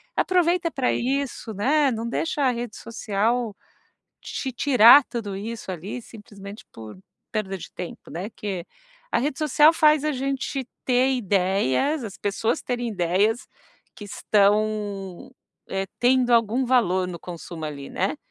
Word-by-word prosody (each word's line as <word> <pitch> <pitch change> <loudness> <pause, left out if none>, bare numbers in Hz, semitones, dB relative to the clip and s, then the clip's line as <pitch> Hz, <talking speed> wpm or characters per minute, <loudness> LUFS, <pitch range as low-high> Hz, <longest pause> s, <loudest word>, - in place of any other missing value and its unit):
aproveita 355 -1 +2
para 260 -4 0
isso, 265 -3 -2
né, 280 +8 +3
não 230 0 -3
deixa 295 +4 -1
a 260 - +4
rede 240 -2 -5
social 225 0 -1 0.7
te 265 - -4
tirar 245 +1 +7
tudo 225 -6 -5
isso 220 +1 -6
ali 185 +7 -6
simplesmente 205 -2 -12
por 110 +7 -10 0.3
perda 200 -3 -2
de 180 - -10
tempo, 180 - -8
né, 180 +5 -5
que 195 -6 -5 0.5
a - - +3
rede 265 +2 -2
social 300 +1 +5
faz 305 -3 +4
a 305 - +1
gente 270 0 -3 0.2
ter 255 +1 +3
ideias, 195 - +1
as 200 -4 -7
pessoas 205 +4 -1
terem 245 -1 -2
ideias 205 +4 0 0.5
que 210 - -10
estão, 205 -2 0 0.4
eh, 195 0 -2
tendo 250 0 +3
algum 230 +2 +3
valor 190 -8 +2
no 175 -1 -6
consumo 170 -2 -8
ali, 140 -2 -6
né, 195 +10 -1
225 Hz, 140 wpm, -24 LUFS, 195-260 Hz, 0.7 s, tirar